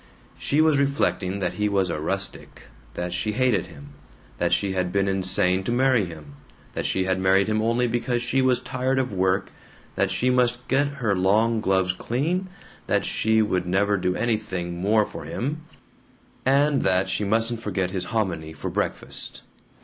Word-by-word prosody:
She 145 +2 +2
was 155 -3 +4
reflecting 135 -9 0
that 90 - -1
he 105 0 0
was 95 -3 +1
a 75 - -3
rustic, 100 +5 -3 0.3
that 90 0 -3
she 105 +4 -1
hated 120 -5 +1
him, 70 0 -13 0.5
that - - +1
she 100 - +1
had 90 -1 -1
been 100 0 +1
insane 95 -1 +2
to - - -1
marry 125 -3 +3
him, 75 -4 -11 0.4
that - - -2
she 95 - 0
had 95 0 0
married 95 +1 +4
him 110 0 +1
only 115 +2 +1
because 120 +1 0
she 130 +2 +1
was 130 -1 +3
tired 130 +1 -1
of 130 -5 -1
work, 95 0 0 0.4
that - - +1
she 125 +1 +1
must 125 -1 +1
get 140 +2 +2
her 125 -8 -1
long 110 +5 +2
gloves 95 -2 +1
cleaned, 155 - -2 0.4
that - - +1
she 110 0 +2
would 90 -4 -1
never 100 +3 +2
do 90 -1 0
anything 95 -7 -2
more 105 +2 +3
for - - -9
him, 150 +5 -4 0.8
and 140 +1 +3
that 95 0 +2
she 95 +2 -1
mustn't 115 +3 +1
forget 95 -5 -2
his 95 -2 -3
hominy 90 -7 -2
for 80 - -5
breakfast. - - -4
105 Hz, 175 wpm, -24 LUFS, 95-125 Hz, 0.8 s, was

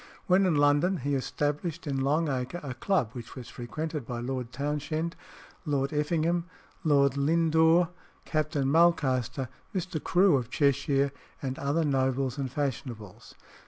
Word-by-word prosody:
When 190 +1 +4
in 170 - +2
London, 145 +6 +3
he 140 0 -2
established 150 +5 -2
in 135 -2 -1
Long 150 +4 +2
Acre 130 +4 -2
a 135 -3 -4
Club, 130 - 0
which 120 -2 -9
was 125 -3 -8
frequented 150 +5 -5
by 120 0 -5
Lord 125 0 -4
Townshend, 150 +4 -2 0.5
Lord 140 -3 -1
Effingham, 165 +3 +1 0.4
Lord 140 -3 +3
Lindore, 160 +3 +4 0.4
Captain 155 -3 0
Mulcaster, 135 -5 +2 0.3
Mr. 175 -4 -3
Crewe 180 -4 +4
of 125 -2 -4
Cheshire, 140 0 +2 0.3
and 130 -1 -4
"other 145 +4 +1
nobles 130 -1 0
and 135 -2 -2
fashionables." 125 -7 -5
145 Hz, 135 wpm, -28 LUFS, 130-160 Hz, 0.5 s, When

